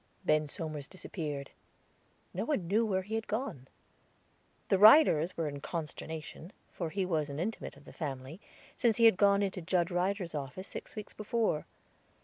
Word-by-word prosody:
Ben 155 -2 +3
Somers 150 -2 -5
disappeared; 150 -7 -5 0.8
no - - -2
one 245 - -1
knew 210 +6 +3
where 190 -2 0
he 210 +4 -7
had 225 0 -2
gone. 210 - -3 1.0
The 195 - +4
Ryders 205 - +7
were 165 -2 0
in 140 -1 -5
consternation, 160 +1 -6 0.2
for 170 -3 -4
he 190 +3 -1
was 155 -5 0
an 140 - -5
intimate 215 +6 -4
of - - -18
the - - -12
family, 140 +3 -5 0.3
since 230 -3 +2
he 230 - +5
had 225 - +8
gone 200 +1 +4
into 190 -1 -2
Judge 175 +1 +1
Ryder's 180 0 -1
office, 145 +6 -5
six - - -8
weeks 210 -1 -7
before. 215 -6 -1
180 Hz, 165 wpm, -32 LUFS, 155-205 Hz, 1.0 s, had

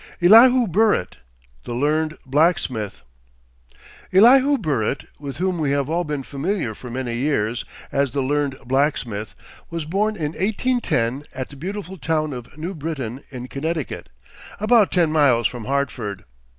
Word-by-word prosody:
ELIHU 235 +7 +7
BURRITT, 205 - +1 0.5
THE 120 - -5
LEARNED 155 +4 0
BLACKSMITH. 135 - 0 1.1
Elihu 260 +8 +6
Burritt, 140 - -1
with 140 -2 -6
whom 185 -1 -1
we 150 -3 0
have 140 +1 -1
all 175 +2 +1
been 150 -4 -3
familiar 145 - -2
for 125 +4 -10
many 125 0 -3
years 120 -4 -1 0.3
as 140 -2 +1
the 140 +2 -1
Learned 145 0 0
Blacksmith, 125 -5 -1 0.3
was 165 -2 -4
born 205 +6 0
in 150 -6 -2
1810 185 - 0
at 130 -1 -4
the 145 - -12
beautiful 190 +4 -6
town 155 -1 -1
of 125 +3 -9
New 170 +5 -4
Britain, 140 - -5
in 125 -2 -7
Connecticut, 155 +3 -4 0.5
about 215 -1 +4
ten 170 -4 +2
miles 135 -7 +3
from 120 -3 -8
Hartford. 125 -7 -2
150 Hz, 140 wpm, -22 LUFS, 130-180 Hz, 1.1 s, ELIHU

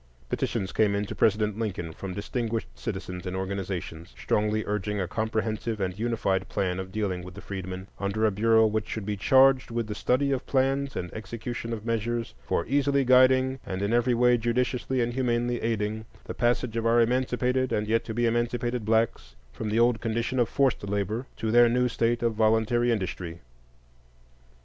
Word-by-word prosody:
Petitions 95 -1 -2
came 105 -2 +2
in 100 +1 -1
to - - -6
President 105 0 +1
Lincoln 90 -7 -3
from 95 +2 -6
distinguished 115 +2 -2
citizens 95 -4 -6
and 90 - -3
organizations, 95 -3 -5
strongly 105 +1 0
urging 105 0 -2
a 90 - -1
comprehensive 110 +2 -2
and 95 0 -3
unified 110 -5 0
plan 90 -1 -1
of 95 0 -6
dealing 95 -3 -2
with 90 0 -10
the - - -8
freedmen, 95 -1 -6
under 100 +2 0
a 110 - +3
bureau 110 +2 +4
which 110 0 -1
should 110 -3 -4
be 105 0 -2
"charged 130 +5 +4
with 115 -1 -2
the 105 - -4
study 130 +6 +1
of 135 -1 -2
plans 135 +1 +1
and 90 -1 -4
execution 115 +1 -5
of 110 -2 -5
measures 115 0 -2
for 85 - -1
easily 140 +1 +2
guiding, 130 +1 +5
and 95 +1 -4
in 100 +3 0
every 120 +1 +3
way 125 0 +4
judiciously 125 +2 0
and 120 0 -1
humanely 120 -1 0
aiding, 110 -1 -1 0.2
the - - -6
passage 120 -1 0
of 115 0 0
our 115 +1 +4
emancipated 125 +1 +1
and 105 - 0
yet 115 +1 +2
to 110 - -5
be 120 +1 +1
emancipated 120 +1 0
blacks 110 - 0 0.2
from 110 - -4
the 105 - 0
old 120 -1 +3
condition 115 +3 -1
of 120 -2 +2
forced 135 -6 +1
labor 105 +5 -2
to 110 - -2
their 120 0 +6
new 125 +1 +2
state 120 0 0
of 115 -1 +2
voluntary 110 +2 +2
industry." 90 -5 -3
110 Hz, 185 wpm, -27 LUFS, 100-120 Hz, 0.2 s, their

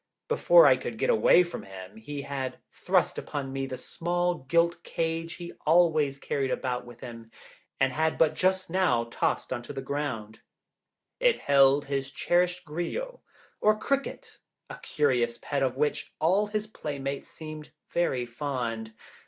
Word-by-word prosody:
Before - - +6
I - - +6
could - - -6
get - - +2
away 315 - +6
from 175 - -6
him, 95 0 -10
he 140 +5 -6
had 135 -2 -4
thrust - - +1
upon 135 -2 -5
me 135 0 -2
the 130 - -5
small 175 +3 -1
gilt 170 0 +3
cage 165 0 -2
he 170 -1 -8
always 155 -4 +3
carried 140 -1 -2
about 125 -1 -2
with 120 -1 -13
him, 115 -2 -9 0.5
and 135 -1 +2
had 160 +2 +1
but 160 -2 +4
just 185 0 +1
now 180 -10 +2
tossed - - -1
on 120 - -4
the 135 +3 -7
ground. 130 -6 -4 0.8
It - - +4
held 140 0 +5
his 135 -1 -2
cherished 175 +4 +1
'grillo,' 175 - -4 0.4
or 215 0 +4
cricket, 275 +4 -3 0.3
a - - -8
curious 125 -5 +1
pet 140 -1 -2
of 130 -1 0
which 150 +1 -1
all 190 +6 +3
his 210 0 -2
playmates 140 -9 -5
seemed 155 -1 -9 0.2
very 130 -8 +1
fond. 120 -3 -4
145 Hz, 155 wpm, -28 LUFS, 130-175 Hz, 0.8 s, Before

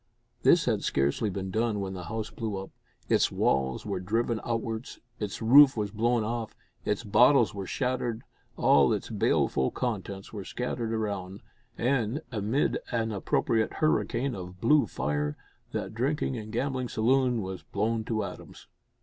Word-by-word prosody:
This - - +5
had - - 0
scarcely 70 +10 +1
been 95 0 -4
done 110 +1 0
when 95 -1 -3
the 90 -2 -6
house 110 0 -4
blew 110 -4 -4
up 95 0 -7 0.4
its - - +3
walls 65 -1 0
were - - -2
driven 110 +4 -1
outwards, 115 0 -3 0.2
its 105 +1 -4
roof 135 +3 +8
was 105 -2 -1
blown 115 +2 +1
off, 115 0 -3 0.3
its 105 +2 -1
bottles 120 0 +5
were 100 -2 -5
shattered, 125 -3 -2 0.3
all - - +5
its - - -4
baleful 65 - +1
contents 100 -5 -4
were 100 -3 -5
scattered 120 +1 -3
around, 100 -3 -3 0.4
and, 125 +3 0
amid 110 +5 0
an 115 -1 0
appropriate 110 +2 0
hurricane 135 -4 +1
of 90 -2 -8
blue 150 +8 +4
fire, 75 0 -2 0.3
that - - -4
drinking 135 +3 -1
and 110 -2 -6
gambling 130 +1 -1
saloon 125 +1 +2
was 95 -1 -6
blown 110 +2 -1
to 110 -1 -1
atoms. - - -9
110 Hz, 150 wpm, -28 LUFS, 100-120 Hz, 0.4 s, roof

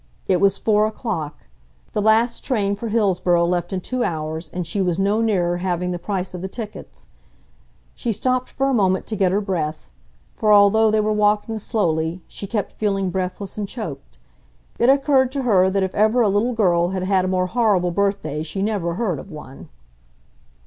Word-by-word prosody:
It 185 -2 +1
was 200 0 +3
four 215 -1 +2
o'clock. 180 - -4 0.5
The 210 - 0
last 220 +3 +2
train 205 -7 0
for 210 +3 -5
Hillsboro 185 -5 +2
left 175 0 -1
in 190 -1 -2
two 255 +5 -2
hours 160 -1 -3
and 180 +1 -4
she 180 +5 -2
was 180 -3 0
no 200 +3 +1
nearer 180 -6 +1
having 180 0 -2
the 175 - -3
price 185 0 -3
of 180 - -6
the 190 - -3
tickets. 210 -1 -9 0.9
She 235 - -3
stopped 255 +4 -1
for 270 - -1
a 275 - +1
moment 190 -5 +2
to 220 - -4
get 190 -3 +2
her 200 - +2
breath; 160 - -3 0.4
for, 215 - +1
although 210 +2 +6
they 215 0 +2
were 215 0 0
walking 210 +1 +1
slowly, 165 -5 -1
she 200 - -7
kept 210 0 -3
feeling 195 -3 -1
breathless 190 +2 -4
and 205 - -2
choked. 140 - -7 0.6
It 235 - +4
occurred 270 -2 +3
to 275 -2 -2
her 190 -6 +4
that 195 0 0
if 190 - -2
ever 220 +4 +3
a 215 - +3
little 210 +5 +1
girl 175 -6 +2
had 190 -1 -3
had 190 0 +2
a - - -1
more 185 0 +1
horrible 195 -4 +1
birthday 195 -5 -1
she 165 +5 -3
never 195 -6 -1
heard 185 - -1
of - - -11
one! 145 -3 -11
195 Hz, 190 wpm, -21 LUFS, 180-215 Hz, 0.9 s, although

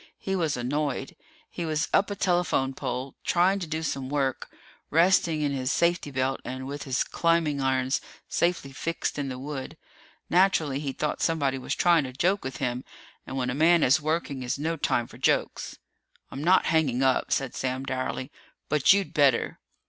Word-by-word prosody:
He 195 - -3
was 160 -7 0
annoyed. 135 +2 -2 0.4
He 175 - -4
was 155 -1 0
up 200 - +3
a 205 - -3
telephone 175 -8 +1
pole, 130 +1 -4
trying 185 +3 +3
to 175 - -5
do 160 +1 -3
some 135 -3 -3
work, 135 -2 -1 0.4
resting 165 -1 +3
in 145 - +1
his 130 -2 -1
safety 170 -3 +1
belt 135 0 -1
and 130 +1 -5
with 140 +1 -6
his 130 -1 +1
climbing 165 -4 +1
irons 130 0 +1 0.3
safely 170 -6 0
fixed 165 +2 -3
in 140 -1 -2
the 130 - -5
wood. 135 0 -6 0.5
Naturally, 165 -6 +3
he 145 -2 -3
thought 150 +2 -3
somebody 140 -5 +1
was 125 - -3
trying 170 -3 +4
to 130 - -7
joke 185 +9 +1
with 130 - -5
him, 125 -1 -2 0.4
and 135 - -5
when 125 -1 0
a - - -2
man 165 +4 +4
is 140 +6 +4
working 155 -3 -2
is 125 +2 -2
no 160 +3 -1
time 120 -6 0
for - - -14
jokes. - - 0 0.5
"I'm 140 - -5
not 185 +3 +4
hanging 135 -6 +2
up," 130 -1 +2
said 135 -3 0
Sam 130 0 -2
dourly, 130 +1 -3 0.4
"but 150 +4 +5
you'd 200 -1 -1
better!" 140 -5 +2
145 Hz, 180 wpm, -27 LUFS, 130-165 Hz, 0.5 s, but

